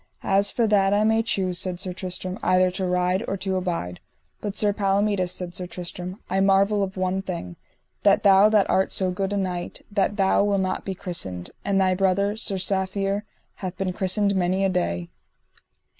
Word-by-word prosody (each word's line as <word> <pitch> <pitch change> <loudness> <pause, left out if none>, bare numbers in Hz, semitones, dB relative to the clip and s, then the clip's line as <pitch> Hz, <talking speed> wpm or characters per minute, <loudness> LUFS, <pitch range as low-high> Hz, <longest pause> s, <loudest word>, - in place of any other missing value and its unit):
As 200 +1 +3
for 235 - +1
that 200 -2 +3
I 210 - +3
may 220 +1 +3
choose, 185 -5 -1
said 185 -2 -3
Sir 185 -2 -4
Tristram, 185 0 -4
either 185 0 +3
to 185 0 -2
ride 180 +2 +1
or 195 - -2
to 190 0 -2
abide. 170 - -3 0.4
But 205 -1 -5
Sir 205 -1 +3
Palomides, 200 -2 +1
said 180 -1 -2
Sir 180 0 -4
Tristram, 180 +1 -7
I 190 +2 0
marvel 195 +1 +3
of 190 -1 -3
one 185 +1 0
thing, 170 - -6 0.5
that - - +4
thou 200 +1 +6
that 210 -3 +3
art 190 - +1
so 185 -1 +2
good 195 +2 -2
a 205 - -1
knight, 180 -3 -4
that 205 0 0
thou 195 0 +3
wilt 200 -1 +1
not 185 - -2
be 190 - -3
christened, 95 - -5
and 195 -1 +1
thy 185 -1 +3
brother, 195 +2 +1
Sir 220 -3 -1
Safere, 195 +1 0 0.4
hath 185 -1 -6
been 190 -1 -2
christened 200 +1 +1
many 190 +1 +1
a - - +2
day. 85 - -2
190 Hz, 190 wpm, -24 LUFS, 180-200 Hz, 0.5 s, thou